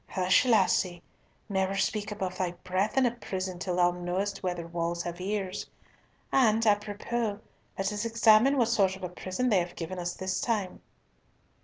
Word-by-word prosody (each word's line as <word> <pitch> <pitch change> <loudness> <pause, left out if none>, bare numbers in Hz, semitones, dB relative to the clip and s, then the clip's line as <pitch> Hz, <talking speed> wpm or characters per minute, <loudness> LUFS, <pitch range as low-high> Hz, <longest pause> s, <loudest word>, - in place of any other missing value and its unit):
"Hush, 185 +4 +3
lassie. 185 -5 +2 0.4
Never 190 -1 0
speak 210 +1 -1
above 190 -3 -4
thy 180 -2 -1
breath 190 +6 -1
in 265 - +5
a 240 - +3
prison 190 -6 -5
till 180 -1 -2
thou 175 0 +4
know'st 180 +3 -3
whether 175 -2 -3
walls 170 0 -2
have 175 +1 -6
ears. 195 -1 -3 0.6
And, 225 -4 +3
apropos, 210 +1 0 0.4
let 195 +1 -1
us 205 +1 -2
examine 230 +3 +5
what 235 -3 +3
sort 190 -2 +2
of 190 - -12
a 180 - -3
prison 185 +7 -2
they 200 -5 +4
have 175 0 -4
given 180 +2 -5
us 175 0 -3
this 190 0 -2
time." 210 -6 -2
190 Hz, 170 wpm, -29 LUFS, 180-215 Hz, 0.6 s, in